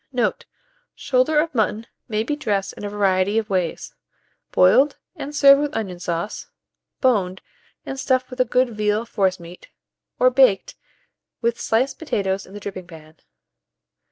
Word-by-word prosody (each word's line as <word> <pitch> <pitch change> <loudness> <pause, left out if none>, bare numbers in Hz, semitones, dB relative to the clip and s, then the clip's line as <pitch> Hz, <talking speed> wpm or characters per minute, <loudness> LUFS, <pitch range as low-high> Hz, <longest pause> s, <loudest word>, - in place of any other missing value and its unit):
Note. 250 -3 -1 0.5
Shoulder 270 +4 +2
of 315 0 -1
mutton 220 -1 0 0.2
may 215 -1 -1
be 295 +6 -2
dressed 205 -9 -2
in - - -11
a 205 - -3
variety 200 0 +1
of 215 -2 -1
ways; 180 -3 -2 0.6
boiled, 270 +11 +4 0.2
and 290 +2 -7
served 275 -1 +7
with 295 0 -2
onion 190 -5 -4
sauce; 175 +3 -4 0.5
boned, 195 -8 +1 0.5
and 270 - -5
stuffed 255 -1 0
with 255 - -9
a - - +6
good 250 +1 +1
veal 210 +1 0
forcemeat; 185 -5 -3 0.5
or 255 0 +4
baked, 250 -7 +3 0.7
with 235 0 0
sliced 240 +5 0
potatoes 195 - -2
in 190 - -13
the - - -6
dripping 190 -3 -7
pan. 160 -2 -14
215 Hz, 150 wpm, -22 LUFS, 190-255 Hz, 0.7 s, served